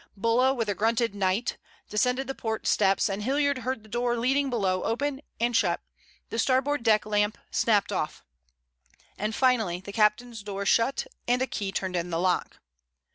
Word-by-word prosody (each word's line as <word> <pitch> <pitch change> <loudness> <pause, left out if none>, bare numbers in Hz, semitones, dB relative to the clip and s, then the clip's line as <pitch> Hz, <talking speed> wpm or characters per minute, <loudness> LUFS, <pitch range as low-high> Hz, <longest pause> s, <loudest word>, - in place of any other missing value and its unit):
Bulla 230 +5 +3
with 235 -5 -1
a 205 - +1
grunted 225 +2 +1
"'Night" 200 +3 0 0.3
descended 250 +5 +1
the 270 - -4
port 220 -4 -4
steps 195 -1 +3
and 200 0 -3
Hilliard 280 +3 +1
heard 255 -2 -3
the - - -16
door 240 +2 0
leading 270 +4 +1
below 190 -6 0
open 275 +4 -1 0.2
and 240 +1 +1
shut; 180 -6 +2 0.5
the 225 - -2
starboard 265 +3 +2
deck 220 -2 +3
lamp 210 0 +1
snapped 215 -4 +2
off, 170 -6 -3 0.9
and 215 +2 -3
finally 225 -9 +2
the 200 +2 -9
captain's 220 +1 +1
door 200 -1 -5
shut 230 - +2 0.2
and 245 +1 +3
a 260 - +1
key 200 -6 -4
turned 190 -1 -3
in 175 0 -1
the 165 -1 -1
lock. 180 0 0
225 Hz, 175 wpm, -27 LUFS, 200-250 Hz, 0.9 s, Bulla